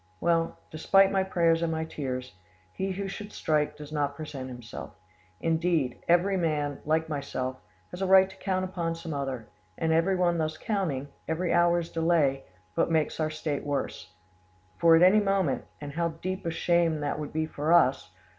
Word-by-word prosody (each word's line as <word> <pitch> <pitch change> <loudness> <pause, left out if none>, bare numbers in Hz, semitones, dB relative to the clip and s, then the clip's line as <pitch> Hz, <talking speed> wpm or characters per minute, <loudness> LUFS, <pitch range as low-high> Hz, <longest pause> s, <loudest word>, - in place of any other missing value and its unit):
Well, 165 -1 +1
despite 195 +5 +4
my 195 - +2
prayers 170 -3 +2
and 165 -1 0
my 160 0 -2
tears, 130 -7 -5 0.4
he 190 - -2
who 195 +1 -4
should 205 +2 -7
strike 150 -1 0
does 150 0 -10
not 145 -2 -1
present 140 -4 -6
himself; 120 -2 -9 0.4
indeed, 165 -5 0
every 180 +3 +3
man, 150 -4 -1
like 160 +1 +1
myself, 130 -3 -3 0.3
has 180 - -7
a 190 - +1
right 190 0 +7
to 190 - -13
count 185 -1 -1
upon 170 -3 -3
some 165 -1 -6
other, 135 -5 -3 0.3
and 160 0 +1
everyone 175 0 +2
thus 155 0 -1
counting, 160 -11 -2 0.2
every 170 +2 0
hour's 175 -1 +3
delay, 160 -5 +2 0.3
but - - +1
makes 160 -2 0
our 155 -1 +1
state 155 -2 -3
worse; 145 -2 -3 0.7
far 165 -1 +7
at 165 - +5
any 190 +4 +7
moment—and 185 -7 -1
how 170 +3 0
deep 175 +3 -5
a - - +2
shame 170 0 +2
would 150 -1 -4
that 145 +1 -3
be 160 0 -1
for 155 0 -2
us! 135 - +4
160 Hz, 175 wpm, -28 LUFS, 145-175 Hz, 0.7 s, right